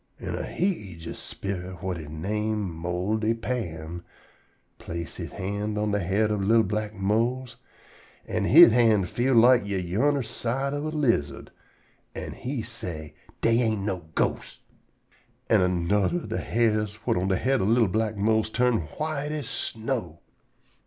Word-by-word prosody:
An' - - -4
a - - -3
heejus 100 - -3
sperit 95 -1 -5
whut 90 +1 -4
he 80 - -8
name 105 +4 -2
Moldy 95 +7 -1
Pa'm 85 -9 -4 0.8
place 85 -2 -6
he - - -4
hand 105 +2 -3
on 105 0 0
de 105 - +1
head 100 +4 +1
ob 105 -2 0
li'l 110 +3 +4
black 105 +1 -3
Mose, 115 +5 0 0.7
an' - - -1
he - - +9
hand 110 -5 +5
feel 125 +2 +1
like 120 +1 +6
ye 100 -1 -1
yunner 120 +11 +1
side 135 +5 -2
ob 145 +1 -2
a 155 - -4
lizard, 95 - 0 0.6
an' - - -5
he 125 -2 -4
say: 80 -10 -7 0.3
"Dey 115 +1 +3
ain't 110 -4 0
no 90 -5 -4
ghosts." - - -1 0.9
An' - - +6
anudder 90 - +1
ob - - -8
de - - -1
hairs 110 -3 +1
whut - - +2
on 90 +2 0
de 95 - +2
head 135 +4 +1
ob 95 - +1
li'l 115 0 +4
black 110 +2 -1
Mose 110 +2 +2
turn 125 0 +2 0.2
white 150 -1 -2
as 150 -2 -4
snow. 110 - -3
105 Hz, 155 wpm, -26 LUFS, 95-120 Hz, 0.9 s, he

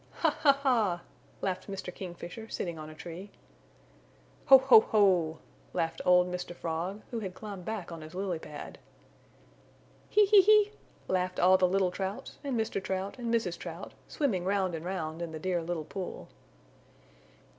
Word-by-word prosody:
"Ha! - - +4
Ha! 285 - +6
Ha!" 215 -10 +2 0.4
laughed 185 -1 -2
Mr. 190 -2 -5
Kingfisher, 180 +5 -8
sitting 170 -3 -4
on 155 0 -8
a 155 - -11
tree. 175 +5 -8 1.2
"Ho! 270 - +11
Ho! 265 -3 +8
Ho!" 185 -8 +2 0.4
laughed 165 0 -1
old 180 0 +6
Mr. 180 -1 -5
Frog, 170 +5 -4
who 235 - -2
had 190 -4 -6
climbed 200 -4 -8
back 210 -6 -4
on 165 -1 -7
his 155 +3 -10
lily 185 -3 -2
pad. 150 -2 -9 1.3
"He! 420 0 +5
He! 400 0 +7
He!" 420 +1 +5 0.4
laughed 185 0 -1
all 185 +1 +6
the 185 - +4
little 185 0 +1
Trouts 190 +2 -5
and 270 -5 -1
Mr. 210 -3 -2
Trout 190 +4 -3
and 235 -1 -2
Mrs. 225 -7 0
Trout, - - -7
swimming 225 - -1
round 190 -1 0
and 160 -1 -5
round 170 -3 -4
in 170 -2 -5
the - - -4
Dear 180 +1 -1
Little 165 -2 -3
Pool. 185 +3 -6
185 Hz, 165 wpm, -30 LUFS, 175-215 Hz, 1.3 s, Ho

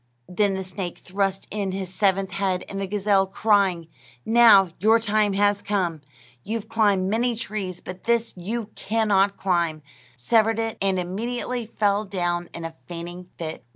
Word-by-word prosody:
Then 195 +2 +1
the 190 - -3
snake 185 -1 -5
thrust 195 0 -2
in 200 -2 -2
his 190 -1 -5
seventh 195 0 +1
head, 195 -2 -1
and 195 0 -5
the 195 - -2
gazelle, 200 -1 +2
crying: 195 -4 +2 0.4
"Now 220 -5 +6
your 220 +5 +5
time 215 -2 +1
has 205 +1 +2
come; 180 -6 -1 0.4
you've 220 0 -4
climbed 205 -4 +2
many 235 +4 +1
trees, 200 -5 -5
but 185 0 -9
this 235 -1 +1
you 210 +5 -4
can 220 +1 -1
not 200 0 +3
climb," 170 -5 0 0.3
severed 220 - +2
it, 225 -1 -2
and 195 -1 +2
immediately 235 +6 -3
fell 205 -2 +1
down 175 -3 -2
in 170 - -7
a 165 - -6
fainting 175 +1 -7
fit. 160 -5 -6
195 Hz, 160 wpm, -24 LUFS, 185-215 Hz, 0.4 s, Now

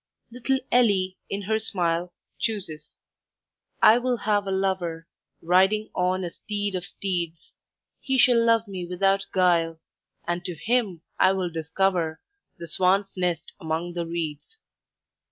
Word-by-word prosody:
Little 250 +3 0
Ellie 195 -6 +3
in 200 0 -3
her 220 +3 0
smile 175 -4 -1 0.3
Chooses... 160 -9 -3 0.9
"I 220 +3 +8
will 250 0 0
have 205 -2 0
a - - -1
lover, 185 -4 -1 0.4
Riding 190 +5 +3
on 185 +1 0
a 175 - -4
steed 205 +1 -3
of 180 0 -3
steeds! 170 -3 -4 0.5
He 265 -1 -1
shall 245 -2 +5
love 230 -1 +3
me 190 -3 -5
without 195 +2 +1
guile, 170 -3 +2 0.5
And 175 0 -1
to 180 -1 -4
him 210 -3 0 0.2
I 190 - +5
will 185 -2 -2
discover 165 0 0 0.4
The 170 - -8
swan's 195 +3 +1
nest 175 -3 -2
among 160 +2 -3
the 170 -1 -3
reeds. 165 - -5
185 Hz, 135 wpm, -25 LUFS, 170-205 Hz, 0.9 s, I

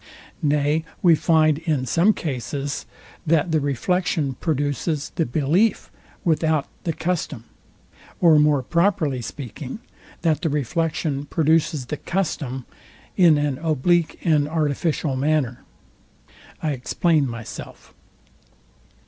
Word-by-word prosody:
Nay 150 +1 +1 0.2
we 175 -2 +7
find 155 -2 +3
in 155 -6 -1
some 170 - +4
cases, 140 - -4 0.4
that 165 +1 +2
the 160 - +3
reflection 145 +1 0
produces 145 0 -2
the 165 - 0
belief 155 - +1 0.3
without 160 -3 +1 0.2
the 165 - +1
custom; 160 -9 -3 0.8
or 165 -4 +6
more 150 -3 +3
properly 170 -5 +1
speaking, 130 - -7 0.5
that 160 -1 +2
the 165 - 0
reflection 150 0 -1
produces 155 -2 +1
the 150 - -4
custom 140 -9 -3 0.5
in 170 -5 +6
an 145 -2 -1
oblique 165 +2 +1
and 150 -3 +3
artificial 155 -2 0
manner. 135 -3 0 1.0
I 155 - +1
explain 145 +3 +1
myself. 115 -2 -9
150 Hz, 105 wpm, -23 LUFS, 140-165 Hz, 1.0 s, we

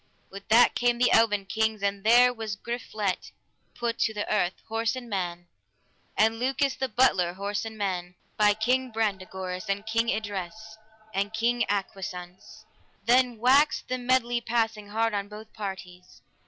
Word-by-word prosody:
With 195 +1 -10
that 230 +3 +6
came 240 0 +1
the 245 +1 +3
eleven 210 -3 +3
kings, 220 +1 -1
and 200 0 -1
there 245 +3 +6
was 220 -3 -5
Griflet 215 -3 -4 0.4
put 235 -1 -2
to 220 - +1
the 205 - -3
earth, 190 -3 +1
horse 225 +2 -1
and 255 -2 -7
man, 175 -4 -4 0.7
and 225 +1 +3
Lucas 270 +2 +1
the 265 - -3
butler, 190 -7 +3
horse 205 +2 -3
and 220 -1 -7
man, 180 -3 -3 0.2
by 210 -1 +4
King 250 +4 0
Brandegoris, 190 -3 -3
and 200 +1 -1
King 230 +1 0
Idres, 205 -5 -3 0.6
and 200 +2 -1
King 235 +1 +1
Agwisance. 185 -2 -5 0.4
Then 245 0 +3
waxed 270 +6 +3
the 255 0 -1
medley 245 -1 +1
passing 225 -2 -1
hard 225 +2 0
on 200 -1 -2
both 215 +1 -11
parties. 185 -3 -8
220 Hz, 155 wpm, -27 LUFS, 195-235 Hz, 0.7 s, that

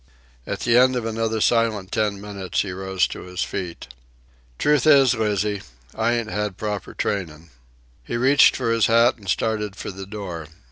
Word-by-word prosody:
At - - -4
the 120 0 +4
end 130 0 +4
of 120 -2 -2
another 115 0 -1
silent 110 -5 +1
ten 105 -3 0
minutes, 100 -2 -3
he 95 - -5
rose 95 0 0
to - - -7
his 90 0 -4
feet. 90 -4 -5 0.7
"Truth 150 -2 +2
is, 135 -4 +6
Lizzie, 105 -3 -1 0.3
I 115 +1 +1
ain't 115 -2 -2
had 105 -3 -3
proper 105 -2 -4
trainin'." 85 -5 -3 0.5
He 120 - -3
reached 135 +3 +5
for 115 - -1
his 115 -1 +3
hat 115 +2 +4
and 100 -4 -10
started 105 -2 -1
for - - -6
the 95 0 -9
door. 90 -7 -6
105 Hz, 175 wpm, -22 LUFS, 95-115 Hz, 0.7 s, is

